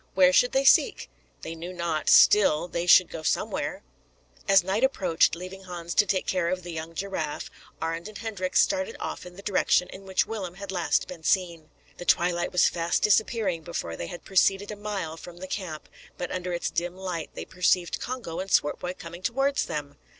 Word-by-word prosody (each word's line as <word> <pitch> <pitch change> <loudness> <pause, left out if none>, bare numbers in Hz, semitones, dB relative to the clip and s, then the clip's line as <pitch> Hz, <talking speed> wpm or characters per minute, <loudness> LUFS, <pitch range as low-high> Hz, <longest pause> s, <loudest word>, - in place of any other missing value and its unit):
Where 185 -1 +6
should 245 +5 +4
they 270 +2 +1
seek? 440 - +4 0.3
They 160 - -5
knew 165 +2 -7
not; 170 -3 -1
still, 175 -5 +6
they 170 0 -3
should 180 0 +7
go 160 - -6
somewhere. 155 - -2 0.6
As 195 -2 +6
night 195 +6 -1
approached, 185 -12 +2
leaving 185 +2 -9
Hans 175 -2 -6
to 205 - +4
take 190 -2 0
care 180 -2 0
of 185 0 -2
the 175 - -7
young 165 0 -6
giraffe, 165 -5 -4 0.3
Arend 165 +3 -3
and 215 -1 -9
Hendrik 205 -5 -4
started 285 -5 +2
off - - -5
in 180 - -12
the 195 - -11
direction 185 -2 +2
in 195 - -11
which 190 - +2
Willem 190 -6 -5
had 195 0 -7
last 175 -3 0
been 175 -3 -9
seen. 170 -2 0 0.3
The 175 - -8
twilight 175 0 +2
was 180 - +4
fast 170 0 -1
disappearing 210 -4 +2
before 155 - -5
they 85 - -5
had 175 - -9
proceeded 195 +1 +2
a - - -5
mile 200 -6 -4
from 175 +1 -11
the 185 - -7
camp, 185 -5 -5 0.3
but 180 - -4
under 180 0 -3
its 175 - -2
dim 175 +1 -2
light 180 -4 -4
they - - -6
perceived 180 -1 +1
Congo 245 -10 -5
and 190 +1 -4
Swartboy 180 +3 +1
coming 170 +1 -9
towards 270 +7 0
them. 145 -1 -5
180 Hz, 195 wpm, -26 LUFS, 170-195 Hz, 0.6 s, should